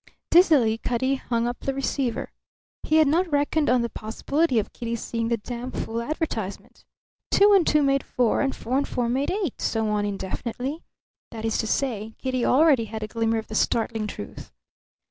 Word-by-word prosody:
Dizzily 285 - +5
Cutty 255 +3 0
hung 235 -2 -1
up 240 - -4
the 275 - -3
receiver. 270 -3 -2 0.5
He 310 - 0
had 315 -2 +6
not 335 +4 +1
reckoned 290 +1 +1
on 250 -1 +3
the 235 - -2
possibility 265 +7 -1
of 215 - -1
Kitty 235 -1 -3
seeing 230 0 -3
that 230 -3 -1
damfool 240 -1 -4
advertisement. 235 - -4 0.5
Two 405 +1 +5
and 380 -4 +4
two 300 -1 +4
made 275 0 +2
four; 245 -3 +1
and 270 -1 0
four 255 +4 -1
and 285 - -2
four 245 -2 -1
made 265 +4 0
eight; 380 - -2
so 220 -1 0
on 210 -1 0
indefinitely. 230 - -4 0.5
That 225 -1 -6
is 225 - 0
to 220 - -1
say, 225 -4 -2
Kitty 255 -2 -2
already 275 -4 +4
had 220 0 -6
a - - -3
glimmer 225 0 0
of 220 - -3
the - - -10
startling 225 0 0
truth. - - -8
245 Hz, 185 wpm, -25 LUFS, 225-280 Hz, 0.5 s, had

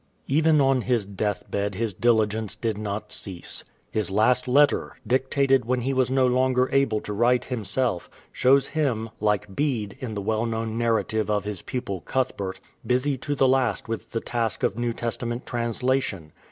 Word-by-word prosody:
"^ - - -41 0.2
Even 155 +2 +4
on 135 -2 +3
his 120 -4 0
death 100 +1 -2
bed 100 -1 -1
his 110 0 -1
diligence 110 -1 +1
did 110 -1 -2
not 105 0 -4
cease. 95 -4 -5 0.3
His 110 -2 -1
last 125 +6 +2
letter, 145 +3 +3
dictated 135 0 +2
when 125 +1 0
he 135 +3 -1
was 130 -1 +2
no 130 0 +3
longer 125 0 +3
able 135 -6 +2
to 105 - -5
write 120 +4 +2
himself, 115 -4 -1 0.2
shows 135 +2 +4
him, 120 -8 -1
like 105 -2 0
Bede 120 -9 -1
in 115 -4 -5
the - - -2
well 110 +3 0
known 115 -1 -2
narrative 110 -2 0
of 105 -1 +1
his 105 -3 -5
pupil 110 -8 -4
Cuthbert, 100 -7 -2 0.2
busy 130 +3 +1
to 145 +3 -3
the 135 -1 +4
last 130 -6 +1
with 115 -1 -4
the 115 - -3
task 115 -3 -2
of - - +1
New 120 0 -1
Testament 120 +1 -3
translation. 120 -7 -1
115 Hz, 175 wpm, -25 LUFS, 105-130 Hz, 0.3 s, Even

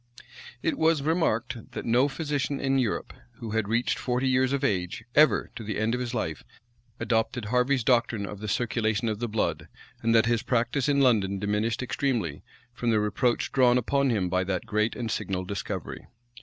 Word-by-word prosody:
It 165 - 0
was 160 -3 +3
remarked, 130 -7 -1
that - - -5
no 120 +4 +3
physician 145 -1 -2
in 135 0 +1
Europe, 120 -5 -2 0.2
who 115 -2 -7
had 110 -2 0
reached 115 +3 0
forty 125 +1 0
years 130 0 +2
of 140 0 -1
age, 95 -3 -1
ever, 150 -8 +4
to 115 - -6
the 105 0 -3
end 110 +2 0
of 125 - -1
his 125 0 -3
life, 80 -8 -3 0.6
adopted 115 0 0
Harvey's 125 +3 +1
doctrine 115 -4 +2
of 100 0 -7
the 105 - -6
circulation 115 +1 0
of 105 -1 -3
the 120 - -2
blood; 110 0 -1 0.3
and 115 0 +2
that 115 - +5
his 115 -1 +1
practice 125 +3 0
in 140 -1 +3
London 105 -7 +3
diminished 105 +4 -1
extremely, 120 - -1 0.3
from 120 -1 -2
the 110 -2 +3
reproach 105 +4 0
drawn 125 -2 +4
upon 140 +3 +1
him 105 -6 +1
by 90 +1 +1
that 95 +2 -2
great 110 -1 0
and 115 -3 -3
signal 95 -1 -2
discovery. 100 -1 -5
115 Hz, 185 wpm, -27 LUFS, 105-130 Hz, 0.6 s, that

